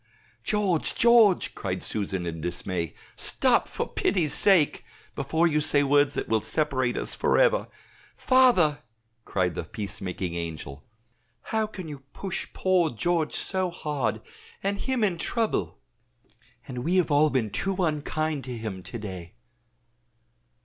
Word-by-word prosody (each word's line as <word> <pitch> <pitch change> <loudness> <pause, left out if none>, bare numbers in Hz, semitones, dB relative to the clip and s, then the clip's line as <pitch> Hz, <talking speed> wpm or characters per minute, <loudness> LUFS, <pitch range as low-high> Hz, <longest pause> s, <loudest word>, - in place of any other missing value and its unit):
"George, 200 -6 0
George!" 230 -5 +5
cried 95 -1 -4
Susan 95 -4 -2
in 80 -1 -5
dismay; 90 0 -3 0.2
"stop, - - +3
for - - -4
pity's 165 -7 0
sake, 185 -8 +4 0.3
before 160 +2 0
you 150 -2 +2
say 145 -1 +4
words 145 0 +3
that - - -3
will 110 -1 +1
separate 130 -5 0
us - - -3
forever. - - +2 0.5
Father," 245 - +4 0.5
cried 90 -3 0
the - - -4
peace 100 +4 -5
making 90 -2 -4
angel, 80 -4 -6 0.6
"how 220 -1 -1
can 185 -5 -8
you 145 -2 -7
push 195 -1 -4
poor 185 -3 +2
George 165 +7 -1
so 185 -1 +1
hard 145 -10 -3 0.4
and 200 +1 -1
him 260 -4 -1
in 180 -5 0
trouble! 190 - -1 0.9
and 125 -2 -5
we 175 +5 0
have 175 -4 +2
all 150 +2 +4
been 125 -7 -1
too 195 0 -1
unkind 155 -3 -1
to 125 -2 -6
him 105 -4 -5
to 90 +6 -7
day." 95 -4 -8
150 Hz, 140 wpm, -26 LUFS, -, 0.9 s, George